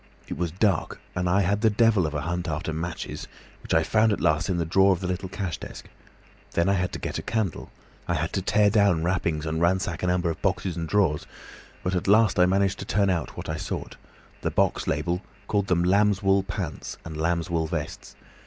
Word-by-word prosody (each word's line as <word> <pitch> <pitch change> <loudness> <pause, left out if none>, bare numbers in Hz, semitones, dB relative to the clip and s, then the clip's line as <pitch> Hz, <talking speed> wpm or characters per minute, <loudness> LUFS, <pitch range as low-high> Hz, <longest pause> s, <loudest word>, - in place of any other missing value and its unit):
It - - -4
was 90 -1 -1
dark, 95 0 0
and 90 -1 -1
I 95 +3 +3
had 100 +3 +1
the 110 - +5
devil 105 -5 +3
of 75 - -5
a 75 - -1
hunt 85 +2 -3
after 80 +1 -3
matches, 85 +2 -5 0.3
which - - -9
I - - +4
found 110 0 +3
at 105 - 0
last 75 +4 +1
in 90 - +1
the 85 - 0
drawer 95 +4 +4
of 90 - -3
the 95 - -5
little 90 +1 -3
cash 95 -3 -4
desk. - - -9 0.6
Then 85 +1 +2
I 100 - +4
had 90 -2 0
to - - -4
get - - -3
a - - -4
candle. 110 -7 -2 0.4
I 85 - +1
had 80 +2 -2
to 95 - 0
tear 105 +2 +3
down 100 -6 +3
wrappings 85 -3 0
and 80 +1 -2
ransack 85 -1 +1
a 90 - 0
number 90 -1 +1
of - - -8
boxes 95 -2 0
and 85 -2 -4
drawers, 95 -8 +1 0.6
but 90 - -1
at 90 0 -1
last 105 -2 +4
I 90 - +6
managed 95 +1 +1
to - - -5
turn 100 -1 +2
out 85 -5 -3
what - - -6
I - - -2
sought; - - -5 0.5
the - - 0
box - - +1
label 90 +1 0 0.3
called 100 -2 0
them 85 -2 +2
lambswool 100 0 +3
pants, 85 -9 -5
and 80 - -7
lambswool 85 0 0
vests. - - -5
90 Hz, 220 wpm, -26 LUFS, 85-100 Hz, 0.6 s, I